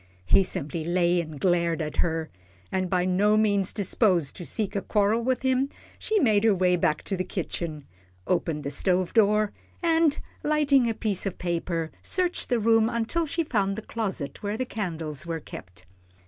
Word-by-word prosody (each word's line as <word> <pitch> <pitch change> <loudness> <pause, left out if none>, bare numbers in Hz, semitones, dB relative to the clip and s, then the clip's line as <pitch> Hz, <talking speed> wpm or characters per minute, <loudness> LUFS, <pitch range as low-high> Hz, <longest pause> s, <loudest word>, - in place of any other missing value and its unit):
He 195 - +5
simply 155 -2 -3
lay 175 +1 +2
and 155 -3 -8
glared 170 -2 +1
at 155 -2 -4
her, 160 -1 -1 0.4
and 185 -1 -1
by 180 -1 +1
no 200 +4 +3
means 200 -3 +2
disposed 185 - +1
to 175 - -7
seek 205 - -3
a 200 - 0
quarrel 210 +3 +1
with 255 +1 0
him, 260 +1 +2 0.3
she 435 - 0
made 215 - +3
her 220 -3 +4
way 180 -1 +3
back 155 -3 0
to 195 - -2
the 185 - -1
kitchen, 170 -5 -4 0.4
opened 165 -4 -1
the 140 - -3
stove 180 +4 0
door, 210 -1 +3 0.3
and, 325 -3 +3 0.2
lighting 285 -5 +3
a 225 - -2
piece 205 -4 -1
of 190 - -4
paper, 170 -2 -2
searched 360 -1 -1
the 245 -3 +2
room 225 0 +4
until 235 +8 -1
she 335 +3 0
found 200 -8 0
the 220 - -6
closet 195 -12 -4
where 205 +1 -2
the 255 - -1
candles 165 - -3
were 165 -1 -2
kept. 95 -9 -11
195 Hz, 180 wpm, -26 LUFS, 170-225 Hz, 0.4 s, He